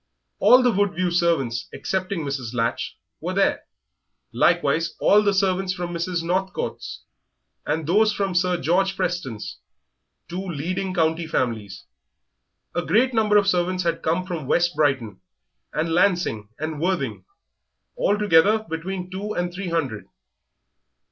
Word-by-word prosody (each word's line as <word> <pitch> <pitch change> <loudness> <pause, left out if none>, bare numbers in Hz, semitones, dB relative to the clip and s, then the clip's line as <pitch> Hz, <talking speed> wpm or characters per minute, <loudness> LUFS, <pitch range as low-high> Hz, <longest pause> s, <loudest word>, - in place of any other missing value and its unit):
All 255 +1 +7
the 245 - +4
Woodview 185 -3 0
servants, 155 -9 +1
excepting 190 -1 -2
Mrs. 130 -4 -4
Latch, 115 0 -1 0.2
were - - -4
there; - - +1 0.7
likewise 165 +1 +2
all 210 - +5
the 205 -1 +2
servants 190 -1 +1
from 175 -1 -5
Mr. 170 0 -2
Northcote's, 190 +3 -3 0.6
and 155 +1 -1
those 210 +7 +4
from 195 -2 -2
Sir 180 0 +1
George 190 +6 +1
Preston's 175 - -3 0.7
two 175 +3 -4
leading 185 +3 -3
county 160 -1 +1
families. 110 -9 -2 0.9
A 175 - 0
great 235 +11 +2
number 215 -2 +3
of 205 - +4
servants 185 -1 +1
had 170 -1 -1
come 170 +3 0
from 170 -7 -5
West 175 +3 +2
Brighton, 130 -10 0 0.5
and 165 +1 -1
Lancing, 175 - +1
and 155 -1 -4
Worthing 185 +2 -1 0.7
altogether 210 - +3
between 180 +3 -5
two 205 +3 -4
and 175 -2 -2
three 185 0 -4
hundred. 140 -11 -2
175 Hz, 130 wpm, -23 LUFS, 160-190 Hz, 0.9 s, All